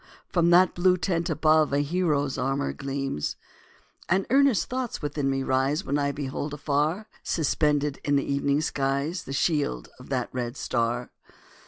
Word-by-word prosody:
from 170 -2 +3
that 180 +2 +5
blue 180 +1 +3
tent 170 -2 -1
above, 155 -1 +3
A 140 +1 +2
hero's 145 -3 0
armour 125 - -1
gleams. 135 - -3 0.7
And 190 +2 +2
earnest 275 -5 +4
thoughts 255 -2 -3
within 145 -2 -2
me 135 0 0
rise, 135 +6 +1
When 145 +2 0
I 140 0 +1
behold 145 +1 -4
afar, 150 +7 0 0.2
Suspended 150 -2 0
in 145 - +1
the 140 - +1
evening 140 +1 +1
skies 140 +4 -1
The - - -7
shield 140 - 0
of - - -13
that - - -1
red 125 +1 -3
star. 120 +1 -1
145 Hz, 155 wpm, -26 LUFS, 135-170 Hz, 0.7 s, that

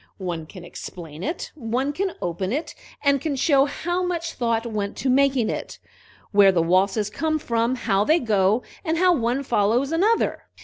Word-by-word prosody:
One 175 -4 -4
can 180 +1 -11
explain 165 -2 -9
it; 325 - -4
one 260 +1 -2
can 380 +4 -2
open 180 +2 -2
it, 300 +6 -3 0.3
and 280 -2 +3
can 295 -1 -2
show 275 0 +4
how 350 +5 -2
much 340 -2 -2
thought 230 -1 -1
went 210 -3 -3
to 265 - 0
making 270 -3 +3
it, - - -6 0.5
where 200 -1 +6
the 180 - +1
waltzes 195 +4 +2
come 310 +6 0
from, 235 -3 0
how 205 -5 +1
they 310 +9 +4
go, 215 - +2 0.2
and 325 -2 0
how 365 +1 +4
one 250 -1 0
follows 240 +4 +1
another." 410 +8 +1
245 Hz, 175 wpm, -23 LUFS, 200-305 Hz, 0.5 s, where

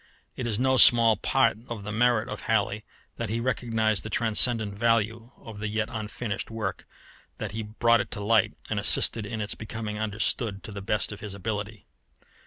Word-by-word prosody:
It 125 - -3
is 110 -3 -1
no 130 +2 +2
small 115 -3 +7
part 105 - +2
of 115 -4 -5
the 105 - -5
merit 120 +1 +2
of - - -6
Halley 105 -2 0 0.3
that 115 -3 -3
he 115 +2 -1
recognized 115 -3 0
the 110 - -7
transcendent 110 -1 +2
value 115 +1 0
of 110 -2 -11
the 105 - -2
yet 110 +1 -1
unfinished 110 0 -4
work, 110 -4 -4 0.5
that - - -5
he 110 +2 -4
brought 115 +2 +2
it - - -7
to - - -6
light, 110 +2 +2
and - - -1
assisted 110 -3 +2
in 110 0 -4
its 105 - -2
becoming 110 -1 -6
understood 110 0 -2
to - - -8
the 100 -1 -6
best 105 +3 -1
of 105 - -8
his 105 -2 -6
ability. 105 0 -5
110 Hz, 190 wpm, -27 LUFS, 105-115 Hz, 0.5 s, small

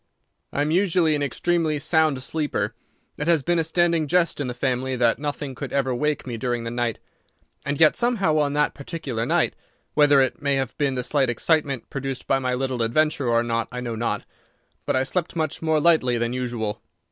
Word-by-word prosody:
"I 145 - 0
am 150 - -1
usually 175 -3 +3
an 145 - -1
extremely 155 +3 0
sound 155 -3 +1
sleeper. 150 +2 -2 0.4
It 150 - -3
has 165 -5 +3
been 175 +2 +1
a - - +2
standing 170 -1 +1
jest 170 -1 +1
in 140 - -2
the 125 - -4
family 130 +1 -1
that 120 0 +2
nothing 145 -1 -4
could - - -6
ever 135 -2 0
wake 150 +3 -1
me 120 -3 -4
during 120 -1 -2
the 115 - -4
night. 120 -2 -1 0.7
And 145 0 -1
yet 160 -1 +6
somehow 200 -11 +1
on 145 -1 +1
that 150 0 +1
particular 135 -6 -4
night, - - +2 0.4
whether 145 -2 +5
it 135 +5 +1
may 140 -1 +1
have 135 -1 -2
been 140 -3 +1
the 125 - -2
slight 135 -1 +1
excitement 140 +1 0
produced 135 -2 -4
by 135 - +2
my 125 -1 -1
little 130 -1 -2
adventure 145 +4 +1
or 115 0 +3
not 115 -1 -1
I 125 - -5
know 120 -2 -4
not, 115 +1 -2 0.6
but - - +1
I 130 - +3
slept 175 +5 -2
much 155 -3 -2
more 160 -1 +2
lightly 145 -7 +3
than 120 +1 -1
usual. 120 -4 -3
140 Hz, 205 wpm, -24 LUFS, 125-155 Hz, 0.7 s, yet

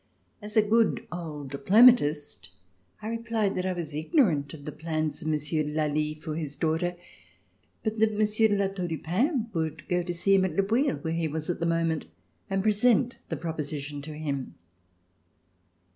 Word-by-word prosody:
As 210 +1 -4
a 215 - +7
good 225 +1 +2
old 150 -6 -6
diplomatist, 150 - +4 0.5
I - - -4
replied 230 -3 -1
that 185 0 -2
I 185 - 0
was 165 -4 -5
ignorant 155 - +2
of 145 -3 -11
the 150 - -4
plans 155 0 -3
of 155 - -5
Monsieur 155 0 0
de 150 0 -2
Lally 155 0 0
for 155 0 -6
his 150 -3 -4
daughter, 165 +2 0 0.9
but 220 0 -2
that 215 -1 +2
Monsieur 215 +1 +3
de 205 - +1
La 200 -1 +2
Tour 185 -2 -4
du 165 -1 -3
Pin 230 - 0
would 160 -2 -3
go 180 0 +1
to 175 0 -4
see 175 +3 +1
him 195 -1 +5
at 185 -4 -1
Le 195 - +3
Bouilh 245 +6 +1
where 160 -1 -1
he 165 -1 0
was 155 +2 -2
at - - -5
the 170 - 0
moment 165 -2 0 0.4
and 195 -1 0
present 230 +3 +3
the 160 - -2
proposition 150 -2 -4
to 150 +1 -8
him. 140 - -4
165 Hz, 185 wpm, -27 LUFS, 155-210 Hz, 0.9 s, a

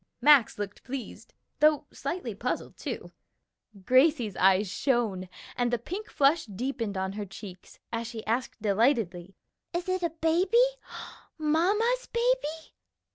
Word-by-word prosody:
Max 290 -6 +6
looked 205 -1 -6
pleased, 260 -1 -7 0.3
though 305 -1 +4
slightly 265 - -4
puzzled, 240 +5 -3
too; - - -6 0.7
Gracie's 255 - +4
eyes 190 +3 +4
shone, 205 -3 0 0.3
and 245 -1 0
the 240 - +2
pink 370 - -6
flush 285 0 +3
deepened 225 0 -3
on 190 0 -1
her 210 +1 -4
cheeks, 190 -1 -11 0.2
as 230 0 -2
she 225 -2 -7
asked 235 +3 -2
delightedly, 200 -4 +1 0.4
"Is 345 +1 -2
it 370 0 0
a 340 - +1
baby? 330 +7 +1 0.8
Mamma's 405 +11 +1
baby?" 470 -10 0
250 Hz, 130 wpm, -28 LUFS, 205-325 Hz, 0.8 s, Max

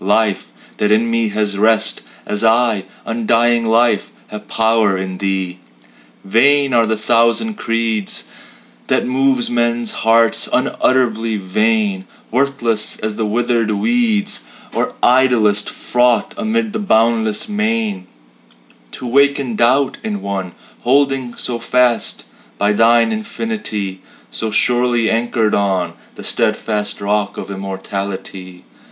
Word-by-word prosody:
Life 105 +1 +1 0.3
that 105 - +1
in 115 +2 +2
me 115 -1 +1
has 105 -1 -1
rest, 110 +1 +3 0.2
As 105 +1 -3
I 115 -3 +2 0.2
undying 115 +1 +1
Life 115 -2 +2 0.2
have 105 0 -9
power 110 -3 +2
in 95 -1 -5
Thee! 95 -2 -2 0.7
Vain 140 +6 +3
are 115 -1 +3
the 110 0 0
thousand 115 - +2
creeds 115 - -2 0.6
That - - +1
move 130 -1 +1
men's 120 -1 0
hearts 115 0 +2
unutterably 115 -4 +1
vain; 100 0 0 0.3
Worthless 120 -4 0
as 110 0 -3
withered 115 +1 0
weeds, 215 - 0 0.3
Or - - -2
idlest 120 -5 +3
froth 125 -1 +1
amid 220 +1 -1
the 220 - -2
boundless 115 - +1
main, 215 -1 -1 0.9
To - - -7
waken 140 -1 +2
doubt 130 +4 +2
in 210 -2 -4
one 95 -3 -4 0.3
Holding 135 -1 +1
so 120 -2 -4
fast 125 -2 +1 0.3
by 105 +8 +2
Thine 115 - +4
infinity; 215 - -4 0.3
So 110 - -3
surely 120 +1 +1
anchored 115 -1 0
on 95 -4 0 0.2
The - - -10
steadfast 105 -2 0
rock 105 0 -1
of - - -6
immortality. 95 -1 -6
115 Hz, 115 wpm, -17 LUFS, 105-125 Hz, 0.9 s, Thine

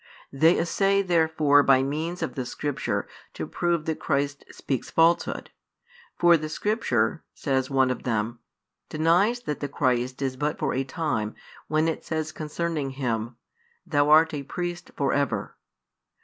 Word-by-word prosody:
They 160 +5 +4
essay 195 +4 +2
therefore 160 -5 +4
by 135 -2 +4
means 160 +5 -3
of 160 - -3
the 130 - -3
Scripture 145 +3 -3 0.3
to - - -4
prove 170 -3 -1
that 160 -1 -2
Christ 140 0 -1
speaks 135 -4 -4
falsehood. 165 +1 +2 0.7
For 175 -1 +6
the 155 0 -5
Scripture, 160 - 0
says 130 -2 -1
[one 135 -2 +3
of 125 - -4
them], 115 0 -2 0.5
denies 175 +10 +2
that 150 -12 -4
the 145 - -3
Christ 130 -2 0
is 130 -1 -2
but 150 +2 -1
for - - -1
a 130 - 0
time, 130 -6 -2 0.3
when 155 +1 +1
it 160 - -2
says 155 -1 -3
concerning 155 -2 -3
Him: 115 -3 -2 0.5
Thou 145 -3 +2
art 160 +1 +6
a 145 - -3
Priest 175 +4 -5
for 140 -1 +1
ever. 140 -2 -1
150 Hz, 150 wpm, -26 LUFS, 135-165 Hz, 0.7 s, For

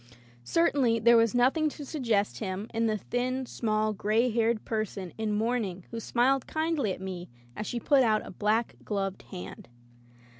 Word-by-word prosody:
Certainly 250 - +2
there 235 +1 +6
was 230 0 +4
nothing 275 +6 +3
to 290 0 -8
suggest 230 -9 0
him 195 -1 -3
in 230 0 +1
the 215 -1 +1
thin, 255 +4 -2
small, 215 -2 0
gray 220 +5 +1
haired 225 -1 +1
person 210 -5 -3
in 220 -1 -2
mourning 210 -4 -1
who 230 - -4
smiled 255 +3 +1
kindly 315 -8 0
at - - -5
me 185 -2 -6 0.3
as 210 - -4
she 240 - -2
put 275 +3 +4
out 220 -3 +2
a - - -8
black 215 +4 0
gloved 195 -2 -2
hand. 95 +4 -8
225 Hz, 165 wpm, -29 LUFS, 210-250 Hz, 0.3 s, there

